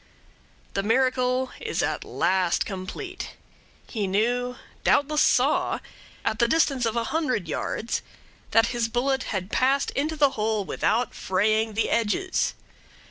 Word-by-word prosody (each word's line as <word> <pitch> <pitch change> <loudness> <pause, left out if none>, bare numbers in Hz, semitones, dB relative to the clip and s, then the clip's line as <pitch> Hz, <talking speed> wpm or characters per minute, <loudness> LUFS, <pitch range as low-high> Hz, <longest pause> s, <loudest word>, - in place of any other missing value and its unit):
The 195 - 0
miracle 255 +3 +1
is - - -2
at - - -1
last 185 -2 +1
complete. 220 - -6 0.5
He 210 -4 -2
knew 245 +5 0 0.3
doubtless 300 +1 +3
saw - - +3 0.5
at 220 - 0
the 235 - +4
distance 275 -4 +2
of 225 - -2
a 235 - +1
hundred 255 - 0
yards 220 +8 -2 0.5
that 225 0 +4
his 235 -1 0
bullet 265 +3 0
had 190 -1 -3
passed 270 +2 +2
into 305 +3 -1
the 290 -3 +4
hole 215 -3 -1
without 230 +5 0
fraying 215 +3 +1
the 225 - +1
edges. 235 - +1
235 Hz, 135 wpm, -25 LUFS, 215-265 Hz, 0.5 s, the